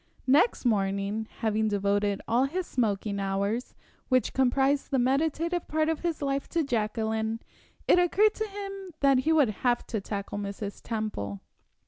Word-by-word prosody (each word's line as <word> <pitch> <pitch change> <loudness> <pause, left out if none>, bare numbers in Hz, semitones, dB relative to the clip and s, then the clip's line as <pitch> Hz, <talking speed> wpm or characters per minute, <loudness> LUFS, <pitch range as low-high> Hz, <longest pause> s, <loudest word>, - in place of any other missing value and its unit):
Next 280 - +3
morning, 200 0 0
having 220 -1 +1
devoted 205 0 0
all 240 +4 +3
his 355 +6 -2
smoking 205 -6 -1
hours, 200 +5 -2 0.3
which 255 -4 +2
comprised 270 +2 +2
the 270 - +1
meditative 315 +7 +1
part 310 0 +1
of 320 - 0
his 335 -4 -2
life, 275 0 -1
to 335 - +1
Jacqueline, 220 -2 -1 0.5
it 360 - +6
occurred 405 +5 +4
to 435 0 -3
him 395 -1 -7
that 275 -2 +5
he 310 +5 +1
would 300 -7 +4
have 245 -1 +1
to 220 -3 -3
tackle 200 0 -4
Mrs. 200 0 -5
Temple. 210 - -3
245 Hz, 150 wpm, -28 LUFS, 205-305 Hz, 0.5 s, it